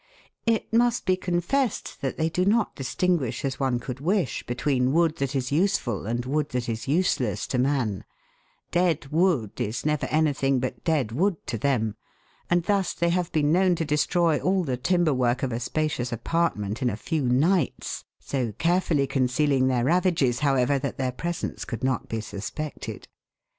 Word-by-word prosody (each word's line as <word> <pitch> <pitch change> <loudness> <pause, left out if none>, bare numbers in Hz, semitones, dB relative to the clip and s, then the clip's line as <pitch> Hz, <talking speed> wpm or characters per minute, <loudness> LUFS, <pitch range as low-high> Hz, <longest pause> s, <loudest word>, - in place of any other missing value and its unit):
It 225 -1 0
must 240 0 +3
be 185 - +3
confessed 185 - -1
that 135 -2 -2
they 160 - +1
do 180 +3 0
not 215 +4 +2
dis 135 - -5
tinguish 150 -10 0
as 135 -2 -3
one 130 -3 +1
could 125 +1 -6
wish 180 +1 0
between 125 +1 +1
wood 165 -1 +2
that 140 -1 -2
is 130 -1 -1
useful 145 - 0
and 120 +2 -2
wood 145 +2 0
that 125 -1 -2
is 115 +3 -4
useless 135 - +1
to 125 - -1
man; 125 -6 0 0.7
dead 170 -5 +1
wood 155 - +1
is 110 +4 -3
never 150 -1 0
anything 140 -4 +2
but 130 0 -4
dead 145 -9 +1
wood 180 - +1
to 120 - -3
them, 110 -3 0 0.6
and 175 0 +3
thus 195 -1 0
they 170 +1 +1
have 175 0 0
been 150 -2 +2
known 180 +1 +4
to 165 - -2
destroy 155 +2 +2
all 185 0 +1
the 130 -6 -1
timber 165 +4 +2
work 125 +1 +1
of 130 - 0
a 115 - -2
spacious 135 -1 -1
apart 165 +8 0
ment 105 +4 -4
in 125 - +2
a 105 - -4
few 155 +7 -2
nights, 140 +6 +1
so 125 -5 -2
carefully 165 - +1
concealing 135 0 +2
their 125 -2 +1
ravages, 165 -7 +2
however, 140 -1 +2
that 140 - -4
their 130 -1 -1
presence 170 +6 -4
could 115 -1 -6
not 130 -1 -1
be 115 - -2
suspected. 110 +8 -6
140 Hz, 180 wpm, -26 LUFS, 125-170 Hz, 0.7 s, known